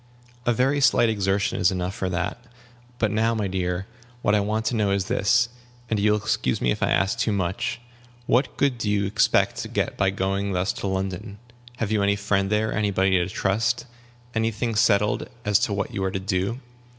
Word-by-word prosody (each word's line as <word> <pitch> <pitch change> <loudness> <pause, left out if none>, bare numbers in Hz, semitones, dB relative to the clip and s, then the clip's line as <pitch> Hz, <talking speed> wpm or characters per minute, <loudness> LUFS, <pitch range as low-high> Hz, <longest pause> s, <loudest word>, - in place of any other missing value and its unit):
"A - - +5
very 135 +5 +2
slight 125 -3 +4
exertion 100 -2 0
is 90 - +4
enough 90 0 -2
for 95 -2 -3
that. 90 +6 -3 0.5
But 110 -4 +1
now, 110 +2 +1
my 105 -2 -1
dear, 90 0 -2 0.4
what 105 - +3
I 105 - +4
want 110 +2 -1
to 120 - 0
know 105 -3 +1
is 100 -1 0
this 115 +2 +2 0.4
and 110 - +1
you 105 +1 +3
will - - +2
excuse 65 -10 0
me 60 - +1
if - - -3
I - - +2
ask 95 +5 +1
too 115 -2 +1
much 95 +2 -2 0.5
what 130 +2 +1
good 135 -4 +1
do 105 - -1
you 100 -1 +1
expect 100 - +2
to - - -4
get - - -2
by 95 - +3
going 95 +1 -1
thus 90 +2 0
to - - -4
London? 95 +2 -3 0.4
Have 110 -3 -2
you 110 -2 +2
any 100 0 +3
friend 100 -1 0
there, 110 +1 +1
any 105 -1 +1
body 95 0 +2
to 90 -1 +2
trust, 110 +3 0 0.5
any 115 0 +1
thing 115 +1 -2
settled 105 0 +2 0.2
as 105 -1 +4
to - - 0
what 100 0 -2
you 95 - -2
are 95 - +1
to 95 - -2
do?" 95 +5 -1
100 Hz, 210 wpm, -24 LUFS, 95-110 Hz, 0.5 s, A